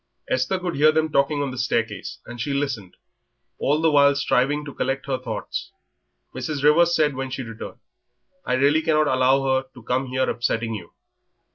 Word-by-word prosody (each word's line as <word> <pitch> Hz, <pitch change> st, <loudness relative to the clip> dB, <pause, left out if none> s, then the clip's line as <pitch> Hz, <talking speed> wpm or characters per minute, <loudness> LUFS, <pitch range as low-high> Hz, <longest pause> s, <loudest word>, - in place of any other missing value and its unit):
Esther 130 Hz, +9 st, 0 dB
could 180 Hz, -2 st, -3 dB
hear 155 Hz, +2 st, +6 dB
them 160 Hz, 0 st, 0 dB
talking 145 Hz, +1 st, +2 dB
on 140 Hz, -, -3 dB
the 130 Hz, -, -6 dB
staircase, 115 Hz, -5 st, -2 dB
and 120 Hz, 0 st, -7 dB
she 140 Hz, +3 st, -2 dB
listened, 125 Hz, -10 st, -3 dB, 0.6 s
all 145 Hz, +2 st, +1 dB
the 160 Hz, 0 st, +3 dB
while 140 Hz, -1 st, +5 dB
striving 145 Hz, +1 st, +1 dB
to 145 Hz, -, -8 dB
collect 135 Hz, +1 st, -2 dB
her 135 Hz, -2 st, -2 dB
thoughts. 110 Hz, -5 st, -5 dB, 0.6 s
Mrs. 145 Hz, -3 st, -4 dB
Rivers 170 Hz, +3 st, +5 dB
said 150 Hz, -2 st, +2 dB
when 135 Hz, 0 st, -4 dB
she 130 Hz, 0 st, -4 dB
returned, 115 Hz, -2 st, -8 dB, 0.7 s
"I -, -, -1 dB
really 140 Hz, +4 st, +3 dB
cannot 155 Hz, -2 st, +2 dB
allow 130 Hz, +1 st, +3 dB
her 130 Hz, 0 st, +1 dB
to 125 Hz, -, -13 dB
come 130 Hz, +3 st, -1 dB
here 130 Hz, +1 st, 0 dB
upsetting 115 Hz, -1 st, -1 dB
you." 90 Hz, -6 st, -8 dB
135 Hz, 180 wpm, -23 LUFS, 125-150 Hz, 0.7 s, hear